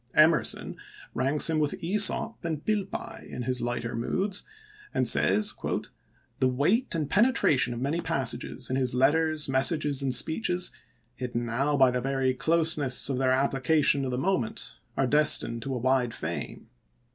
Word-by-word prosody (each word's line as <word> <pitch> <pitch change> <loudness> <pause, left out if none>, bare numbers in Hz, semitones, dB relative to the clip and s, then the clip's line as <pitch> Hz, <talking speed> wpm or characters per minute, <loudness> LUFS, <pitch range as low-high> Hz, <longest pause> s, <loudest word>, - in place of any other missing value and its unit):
Emerson 155 +1 +2 0.4
ranks 135 +4 0
him 160 -1 0
with 150 -1 -1
iEsop 205 +5 +2
and 160 -3 -4
Pilpay 205 -3 -4
in 125 - -6
his 125 +1 0
lighter 120 -1 -3
moods, 190 - -2 0.5
and - - +1
says: 210 0 +3 0.4
" - - -39
The 130 - +3
weight 160 - 0
and 155 -3 -2
penetration 200 - +2
of - - -6
many 145 +7 -2
passages - - -2
in 130 - -2
his 125 -2 0
letters, 155 +4 +2
messages, 140 +1 +1
and 135 -1 -1
speeches, 175 - 0 0.5
hidden 120 -2 -4
now 135 +6 -1
by 130 -2 +5
the 125 0 -2
very 135 0 0
closeness 155 -2 +3
of 130 -2 -2
their 130 -1 +1
application 140 +2 +2
to 135 - -3
the 125 - -3
moment, 135 -7 -2 0.2
are 135 - +2
destined 135 -4 +2
to 135 +1 -4
a - - -2
wide 125 -1 0
fame. - - -6
135 Hz, 155 wpm, -27 LUFS, 130-160 Hz, 0.5 s, by